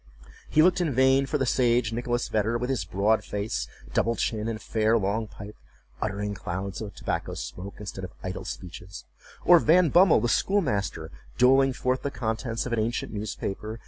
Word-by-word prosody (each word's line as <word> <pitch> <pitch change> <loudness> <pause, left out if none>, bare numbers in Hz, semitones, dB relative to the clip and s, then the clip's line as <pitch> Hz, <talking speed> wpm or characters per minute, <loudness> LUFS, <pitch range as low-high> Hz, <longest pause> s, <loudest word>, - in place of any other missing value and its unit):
He 155 - +5
looked 180 +1 +4
in 155 -8 0
vain 130 +1 +4
for 150 - 0
the 135 - 0
sage 120 -2 +2
Nicholas 120 +1 -1
Vedder, 110 +2 0
with 125 +2 -2
his 110 -9 -1
broad 100 +5 +1
face, 100 - -3 0.3
double 115 0 +1
chin, 110 -1 -1
and 115 -1 -3
fair 110 +1 +1
long 110 +2 -1
pipe, 105 0 -10 0.5
uttering 105 -1 -2
clouds 95 0 -5
of 105 -2 -7
tobacco - - -3
smoke 95 +3 -7
instead 100 -2 -7
of 90 - -10
idle 95 - -4
speeches; 90 +2 -8 0.4
or 175 -1 +8
Van 170 +2 +4
Bummel, 180 +4 +6
the 120 - 0
schoolmaster, 110 - 0 0.3
doling 135 +2 +5
forth 130 +1 -1
the 140 - -2
contents 115 -1 -3
of 125 - -3
an 115 - +1
ancient 115 +1 -2
newspaper. 105 +1 -4
115 Hz, 175 wpm, -26 LUFS, 100-130 Hz, 0.5 s, or